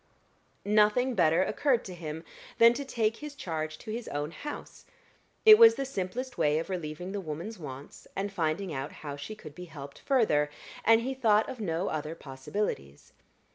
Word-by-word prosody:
Nothing 215 Hz, +5 st, +3 dB
better 165 Hz, -3 st, +4 dB
occurred 255 Hz, +2 st, +1 dB
to 185 Hz, -, -7 dB
him 160 Hz, -2 st, -6 dB, 0.3 s
than 230 Hz, +1 st, +7 dB
to 280 Hz, -, -4 dB
take 225 Hz, -4 st, 0 dB
his 300 Hz, -1 st, -8 dB
charge 155 Hz, -, -4 dB
to 215 Hz, -, -8 dB
his 230 Hz, +1 st, -5 dB
own 145 Hz, +2 st, -3 dB
house; 295 Hz, -, -8 dB, 0.6 s
it 430 Hz, 0 st, +10 dB
was 460 Hz, 0 st, +9 dB
the 275 Hz, -, -2 dB
simplest 250 Hz, +2 st, -4 dB
way 150 Hz, 0 st, +3 dB
of 165 Hz, +4 st, -3 dB
relieving 175 Hz, +1 st, -4 dB
the 200 Hz, 0 st, -3 dB
woman's 175 Hz, +6 st, -6 dB
wants, 140 Hz, -2 st, -9 dB
and 200 Hz, +1 st, -3 dB
finding 165 Hz, +1 st, -1 dB
out 135 Hz, +1 st, -4 dB
how 145 Hz, -1 st, -4 dB
she 145 Hz, +10 st, -7 dB
could 155 Hz, -8 st, -11 dB
be 180 Hz, +3 st, -9 dB
helped 140 Hz, -4 st, -10 dB
further; 210 Hz, -, +2 dB, 0.3 s
and 225 Hz, +1 st, +6 dB
he 260 Hz, +3 st, -2 dB
thought 220 Hz, -5 st, +3 dB
of 255 Hz, -, -7 dB
no 180 Hz, -3 st, -1 dB
other 155 Hz, +1 st, -3 dB
possibilities. 135 Hz, -, -5 dB
185 Hz, 175 wpm, -29 LUFS, 155-230 Hz, 0.6 s, it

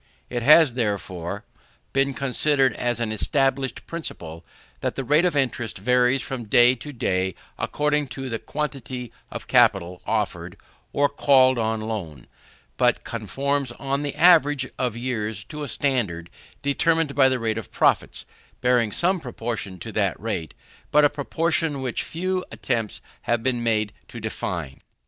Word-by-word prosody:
It 120 Hz, -1 st, -1 dB
has, 150 Hz, +1 st, +7 dB
therefore, 100 Hz, -4 st, -3 dB, 0.5 s
been 135 Hz, 0 st, +2 dB
considered 135 Hz, -2 st, +2 dB
as 120 Hz, -1 st, -1 dB
an 115 Hz, -2 st, -1 dB
established 135 Hz, +2 st, 0 dB
principle, 85 Hz, -, -7 dB, 0.4 s
that -, -, -2 dB
the 135 Hz, -, -3 dB
rate 150 Hz, +7 st, +3 dB
of 175 Hz, -, +1 dB
interest 120 Hz, -7 st, -1 dB
varies 125 Hz, +5 st, +2 dB
from 125 Hz, -3 st, -5 dB
day 120 Hz, +3 st, +6 dB
to 130 Hz, +4 st, -8 dB
day 95 Hz, -7 st, -1 dB, 0.2 s
according 150 Hz, -1 st, 0 dB
to 135 Hz, 0 st, -4 dB
the 115 Hz, -3 st, -3 dB
quantity 130 Hz, -5 st, -5 dB, 0.2 s
of -, -, -7 dB
capital 90 Hz, +1 st, +3 dB
offered -, -, -2 dB, 0.3 s
or 145 Hz, 0 st, +3 dB
called 130 Hz, -3 st, +4 dB
for -, -, +1 dB
on 110 Hz, 0 st, -1 dB
loan; 95 Hz, -, -5 dB, 0.5 s
but -, -, +2 dB
conforms 135 Hz, +4 st, -2 dB
on 140 Hz, +2 st, -2 dB
the 145 Hz, -1 st, -3 dB
average 145 Hz, -6 st, +5 dB
of 125 Hz, -3 st, -1 dB
years 110 Hz, -4 st, -3 dB
to 150 Hz, -1 st, -8 dB
a 145 Hz, -, -3 dB
standard 110 Hz, -13 st, -1 dB, 0.3 s
determined 160 Hz, +1 st, +2 dB
by 135 Hz, -2 st, +5 dB
the 130 Hz, -, +1 dB
rate 115 Hz, -2 st, -1 dB
of 115 Hz, -, -10 dB
profits, -, -, +1 dB, 0.3 s
and -, -, -35 dB
bearing 125 Hz, -3 st, +3 dB
some 180 Hz, -, +2 dB
proportion 115 Hz, -, -5 dB
to -, -, -7 dB
that -, -, 0 dB
rate 80 Hz, -3 st, -4 dB, 0.3 s
but 150 Hz, 0 st, +5 dB
a 145 Hz, -, +3 dB
proportion 160 Hz, 0 st, 0 dB
which 130 Hz, -4 st, -2 dB
few 185 Hz, +2 st, -2 dB
attempts 115 Hz, -5 st, -2 dB, 0.3 s
have 120 Hz, -1 st, +2 dB
been 125 Hz, -2 st, +1 dB
made 110 Hz, -3 st, 0 dB
to 120 Hz, -, -9 dB
define. 85 Hz, -10 st, -4 dB
125 Hz, 155 wpm, -24 LUFS, 110-140 Hz, 0.5 s, has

